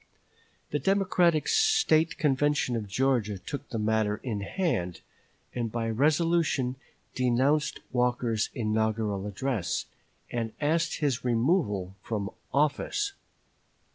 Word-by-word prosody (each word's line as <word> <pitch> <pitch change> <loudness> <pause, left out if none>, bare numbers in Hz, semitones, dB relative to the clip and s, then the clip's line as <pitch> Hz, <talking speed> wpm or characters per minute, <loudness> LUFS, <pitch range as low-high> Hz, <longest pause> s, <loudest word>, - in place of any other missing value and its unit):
The 150 - 0
Democratic 180 -2 +2
State 440 - +3
Convention 145 -3 +1
of 110 -3 -3
Georgia 110 -2 +1
took 140 +9 -7
the 115 - -3
matter 110 -1 +1
in 115 -6 -2
hand, 95 - -2 0.5
and 120 -3 -2
by 115 -1 -1
resolution 150 0 +2 0.4
denounced 130 +4 +1
Walker's 120 -3 +1
inaugural 110 -2 0
address, 105 - -2 0.5
and 115 -2 -2
asked 165 +2 +1
his 140 -6 0
removal 115 - +1
from 100 -3 -3 0.2
office. 155 - +1
125 Hz, 105 wpm, -28 LUFS, 110-155 Hz, 0.5 s, State